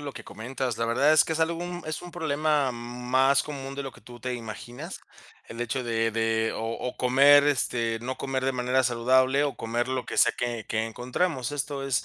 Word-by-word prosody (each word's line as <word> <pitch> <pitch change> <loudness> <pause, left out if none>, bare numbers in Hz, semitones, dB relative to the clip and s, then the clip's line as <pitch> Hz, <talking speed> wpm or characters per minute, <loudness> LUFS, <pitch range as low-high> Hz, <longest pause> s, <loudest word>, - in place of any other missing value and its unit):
lo 145 -1 -5
que - - -10
comentas, 125 +1 -4
la 115 - +1
verdad 130 +6 +3
es 155 - +7
que 160 - -2
es 160 - -2
algo, 165 +2 0
mm, 175 -1 -6
es 155 - -4
un 175 - -9
problema 150 -4 0
más 125 +3 +1
común 135 -2 -6
de 140 - -3
lo 135 - -6
que 120 - -17
tú 120 +3 -12
te 125 +2 -3
imaginas, 120 - -7 0.5
el 115 +1 -8
hecho 125 +2 -2
de 115 -1 0
de 110 0 0
o - - -4
o 125 - -5
comer, 140 +3 +6
este 120 -5 0
no 130 +2 -4
comer 130 -1 -2
de 135 - +2
manera 125 +1 +1
saludable, 130 +3 +3
o 140 - -1
comer 120 +2 -2
lo 130 -1 -2
que - - -5
sea 120 - +5
que 120 -3 -3
que 110 0 -1
encontramos. 130 +4 -2
Esto 145 -1 -3
es 130 -3 0
130 Hz, 220 wpm, -27 LUFS, 120-140 Hz, 0.5 s, es